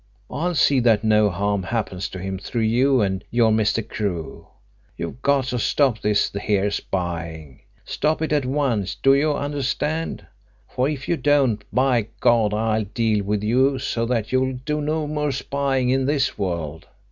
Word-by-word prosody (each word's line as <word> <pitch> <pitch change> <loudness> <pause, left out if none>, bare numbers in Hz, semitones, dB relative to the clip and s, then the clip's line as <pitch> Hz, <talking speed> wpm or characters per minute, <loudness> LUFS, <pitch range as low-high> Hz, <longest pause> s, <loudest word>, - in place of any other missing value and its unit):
I'll 175 +3 -1
see 140 -3 +4
that 115 -3 +3
no 105 -1 +4
harm 100 +2 -1
happens 95 -2 -3
to - - -8
him 95 +1 -4
through 115 +4 -3
you 125 +3 +3
and 95 -2 -1
your 115 -2 +3
Mr. 110 0 +1
Crewe. 95 -8 -4 0.5
You've 85 +9 -6
got 140 -1 +2
to 125 - -1
stop 130 -1 +1
this 105 -1 +1
here 100 0 0
spying. 85 -7 -4 0.3
Stop 155 +1 -1
it 155 - -1
at 145 -2 +2
once, 125 -8 -1
do 135 +7 +4
you 145 +2 +2
understand? 145 +3 -2 0.4
For 130 +2 -1
if 140 -3 -5
you 170 - +1
don't, 135 -8 +2
by 125 -4 +2
God, 115 -3 +3
I'll 110 0 0
deal 110 0 0
with 105 +1 -1
you 130 +5 +2
so 115 -2 -2
that 115 -3 -1
you'll 130 0 +1
do 150 0 -1
no 155 +1 -1
more 150 -1 -1
spying 135 -1 -1
in 135 0 +1
this 145 -2 +1
world! 85 -5 -4
115 Hz, 170 wpm, -22 LUFS, 105-140 Hz, 0.5 s, see